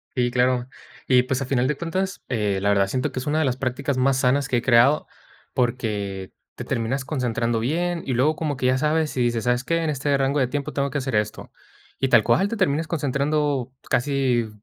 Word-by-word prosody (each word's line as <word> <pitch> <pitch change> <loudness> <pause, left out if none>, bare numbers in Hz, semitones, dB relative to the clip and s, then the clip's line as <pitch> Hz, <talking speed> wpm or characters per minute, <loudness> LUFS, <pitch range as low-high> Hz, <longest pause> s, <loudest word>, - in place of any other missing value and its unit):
Sí, 125 -1 +1
claro. 125 0 +1 0.4
Y, 125 -1 +5
pues, 130 +1 -2
a - - -5
final 130 -1 +1
de 150 - 0
cuentas, 185 +4 -3
eh, 105 -5 0
la 100 - +1
verdad, 100 -1 +3
siento 125 +6 -2
que - - -4
es 130 - -7
una 155 +2 +1
de 160 - +2
las 130 -2 0
prácticas 130 +1 -2
más 130 +1 +2
sanas 135 +2 +2
que 130 - +1
he - - 0
creado, 125 +4 +4 0.5
porque, 105 -6 -2 0.2
te - - -6
terminas 125 +4 -2
concentrando 120 -5 -1
bien. 170 +8 -1
Y 130 - -2
luego 145 +6 +2
como 150 -3 -3
que 130 - -3
ya 130 +1 +3
sabes, 155 +1 0
y 130 - 0
dices, 120 -2 0
¿sabes 125 0 +1
qué? 165 +4 0
En 155 - 0
este 140 0 0
rango 135 +2 +1
de 130 - +2
tiempo 140 +2 -4
tengo 140 0 0
que 140 - -3
hacer 135 -2 -3
esto. 105 0 -2 0.5
Y 135 - +1
tal 135 - +5
cual, 195 - +3
te 230 - -4
termines 165 -4 +1
concentrando 145 -3 -1 0.2
casi 125 -3 +1
130 Hz, 220 wpm, -23 LUFS, 120-145 Hz, 0.5 s, Y